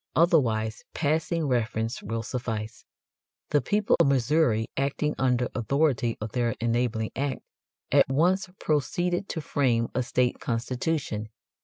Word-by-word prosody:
Otherwise 115 - +2
passing 160 +1 0
reference 115 -1 -1
will 115 +2 -3
suffice. 110 -2 -4 0.7
The 145 - +4
people 205 - +2
of - - +5
Missouri 135 -3 +2
acting 140 +2 0
under 125 -2 +2
authority 130 -1 +1
of 110 0 -5
their 120 -2 0
enabling 115 -1 0
act, 135 -1 -2 0.5
at - - +5
once 180 +8 +2
proceeded 175 +5 0
to 160 - -3
frame 120 -6 +1
a 125 - +1
state 125 0 0
constitution. 120 -1 -2
125 Hz, 125 wpm, -27 LUFS, 115-150 Hz, 0.7 s, of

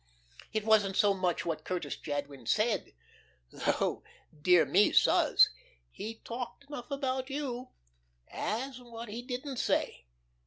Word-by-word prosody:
It 215 -1 -1
wasn't 205 -3 +4
so 205 -1 +4
much 185 -3 -1
what 165 -2 -2
Curtis 180 -1 -3
Jadwin 145 -4 -5
said 215 - +1 0.6
though, - - 0 0.4
dear 175 0 +6
me 200 +8 +4
suz, - - +5 0.4
he 220 - -6
talked 245 +3 -6
enough 280 -4 -8
about 265 -2 -2
you 265 -3 -3 0.6
as 255 +4 -3
what 235 -2 -9
he 225 +3 -5
didn't 255 +2 -5
say. - - 0
225 Hz, 125 wpm, -31 LUFS, 185-255 Hz, 0.6 s, dear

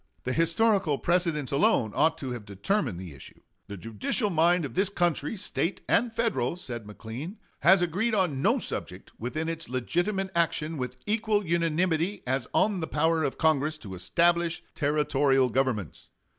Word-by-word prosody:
The 125 - -1
historical 170 - +2
precedents 170 -5 0
alone 140 - +3
ought 160 +2 +2
to 135 -4 -5
have 120 -3 -5
determined 100 - -1
the 90 -5 -8
issue. 70 - -14 0.3
"The 100 - -7
judicial 115 - -2
mind 170 0 +3
of 140 - -7
this 190 +1 +1
country, 175 -1 0
State 190 -1 -2
and 240 0 +2
Federal," 225 - 0
said 120 -11 -7
McLean, 120 - -7 0.2
"has 180 +4 +5
agreed 200 +7 0
on 175 -9 +1
no - - +3
subject - - -6
within 155 +8 -3
its 165 -3 -4
legitimate 175 - -1
action 165 -2 0
with 125 0 -4
equal 215 -1 +1
unanimity 170 +2 0
as 130 0 -1
on 205 -3 +2
the 160 - -3
power 160 +1 +1
of 135 - -2
Congress 155 -1 +2
to 100 -10 -9
establish 170 - +1
Territorial 140 -3 +2
governments. 120 - -2
160 Hz, 155 wpm, -27 LUFS, 130-180 Hz, 0.3 s, has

